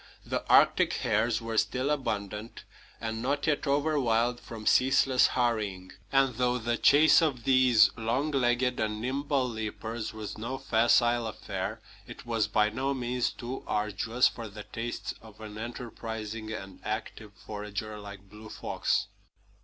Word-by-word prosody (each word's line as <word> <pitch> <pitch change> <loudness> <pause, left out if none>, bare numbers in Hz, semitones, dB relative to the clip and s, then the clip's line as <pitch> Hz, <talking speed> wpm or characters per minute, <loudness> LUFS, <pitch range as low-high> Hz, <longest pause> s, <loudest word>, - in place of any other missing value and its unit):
The - - -2
Arctic - - +5
hares 110 +2 0
were 115 -1 0
still 130 +3 0
abundant, 105 -6 -3 0.4
and 115 0 -4
not 140 +3 -1
yet 150 -1 0
overwild 130 -5 +1
from 110 -2 -9
ceaseless 130 +1 +4
harrying; 105 -7 -1 0.2
and 135 -1 +3
though 125 0 +2
the 120 0 -1
chase 150 +4 +6
of 140 -7 0
these 125 -5 +5
long 120 +7 -1
legged 125 -2 +1
and 110 -1 -1
nimble 135 +2 0
leapers 110 0 -4
was 110 -1 -7
no 125 +4 -4
facile 120 -1 +3
affair, 110 - -5 0.3
it - - -10
was 115 -2 0
by 105 0 +2
no 135 +4 -1
means 125 -1 -1
too 125 +2 -7
arduous 105 +4 +1
for 115 -1 -6
the 105 0 -9
tastes 115 +3 -5
of 110 -1 -15
an 105 -1 -8
enterprising 110 -2 -6
and 95 -3 -7
active 110 0 -5
forager 105 0 -6
like 100 -1 -10
Blue 105 +2 -12
Fox. - - -1
115 Hz, 145 wpm, -29 LUFS, 110-130 Hz, 0.4 s, chase